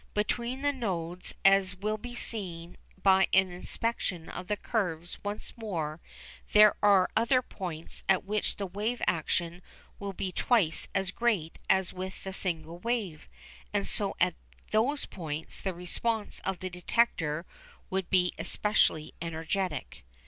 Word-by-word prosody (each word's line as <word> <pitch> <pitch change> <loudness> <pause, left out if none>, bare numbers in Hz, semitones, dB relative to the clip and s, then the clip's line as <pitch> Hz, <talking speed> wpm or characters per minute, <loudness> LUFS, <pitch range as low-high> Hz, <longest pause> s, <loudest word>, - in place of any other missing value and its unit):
Between 240 +5 -1
the 285 0 +3
nodes, 180 -8 -3
as 195 -1 +6
will 215 +3 -2
be 245 +2 -7
seen 175 -8 -3 0.3
by 190 -1 +6
an 190 -1 +5
inspection 180 -2 -2
of 180 - -6
the 210 - 0
curves 175 -8 -2
once 205 +1 -4
more, 165 -9 -3 0.5
there 210 0 +9
are 200 -3 +5
other 250 +3 +4
points 170 -7 -6
at 190 -1 +4
which 210 +1 0
the 200 - -3
wave 210 +6 -2
action 170 +1 0 0.4
will 200 -1 -4
be 185 0 -3
twice 185 -5 +2
as 190 -1 +1
great 205 -10 0
as 190 -2 +3
with 185 +1 -6
the 190 - -5
single 170 -3 -3
wave, 205 -8 -2 0.5
and 200 - +2
so 200 -1 0
at 180 0 +4 0.4
those 255 +7 +2
points 160 -3 -5
the 190 - -1
response 205 +5 -1
of 190 -1 -3
the 185 - -2
detector 175 -4 +1 0.5
would 190 -1 -1
be 180 -2 +4
especially 205 -7 +2
energetic. 165 - -3
190 Hz, 140 wpm, -30 LUFS, 175-215 Hz, 0.5 s, there